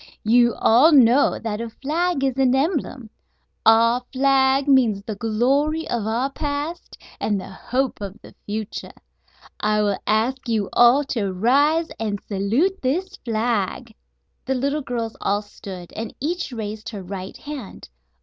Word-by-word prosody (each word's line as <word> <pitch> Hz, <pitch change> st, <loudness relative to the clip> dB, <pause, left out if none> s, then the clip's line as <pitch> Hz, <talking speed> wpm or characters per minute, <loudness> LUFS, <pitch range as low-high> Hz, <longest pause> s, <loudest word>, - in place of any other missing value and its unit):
You 240 Hz, +1 st, +4 dB
all 255 Hz, +9 st, +5 dB
know 260 Hz, 0 st, +5 dB
that 220 Hz, -1 st, -4 dB
a 235 Hz, -, -4 dB
flag 305 Hz, +5 st, -1 dB
is 265 Hz, -2 st, +1 dB
an 260 Hz, -1 st, +3 dB
emblem. 270 Hz, -, -2 dB, 0.6 s
Our 230 Hz, +2 st, +5 dB
flag 270 Hz, +1 st, +3 dB
means 240 Hz, -8 st, +3 dB
the 215 Hz, -, -4 dB
glory 265 Hz, +9 st, 0 dB
of 225 Hz, -3 st, -2 dB
our 245 Hz, +5 st, -1 dB
past 295 Hz, +4 st, -4 dB, 0.2 s
and 205 Hz, -2 st, 0 dB
the 190 Hz, -, -9 dB
hope 255 Hz, +5 st, -2 dB
of 200 Hz, +1 st, -7 dB
the -, -, -15 dB
future. 215 Hz, +1 st, -5 dB, 0.7 s
I 210 Hz, 0 st, +1 dB
will 205 Hz, -2 st, 0 dB
ask 240 Hz, +4 st, 0 dB
you 215 Hz, -4 st, 0 dB
all 240 Hz, +4 st, +6 dB
to 205 Hz, -6 st, -1 dB
rise 285 Hz, -, +2 dB
and 210 Hz, -2 st, -2 dB
salute 230 Hz, -, 0 dB
this 360 Hz, +9 st, -1 dB
flag!" 225 Hz, -, -2 dB, 0.5 s
The 265 Hz, -, -1 dB
little 280 Hz, +4 st, -1 dB
girls 230 Hz, -3 st, -4 dB
all 205 Hz, +1 st, 0 dB
stood, 190 Hz, -3 st, -10 dB
and 225 Hz, 0 st, -6 dB
each 340 Hz, +2 st, -3 dB
raised 220 Hz, -2 st, -5 dB
her 205 Hz, -4 st, -7 dB
right 190 Hz, 0 st, -7 dB
hand. 285 Hz, -, -9 dB
240 Hz, 150 wpm, -22 LUFS, 215-275 Hz, 0.7 s, all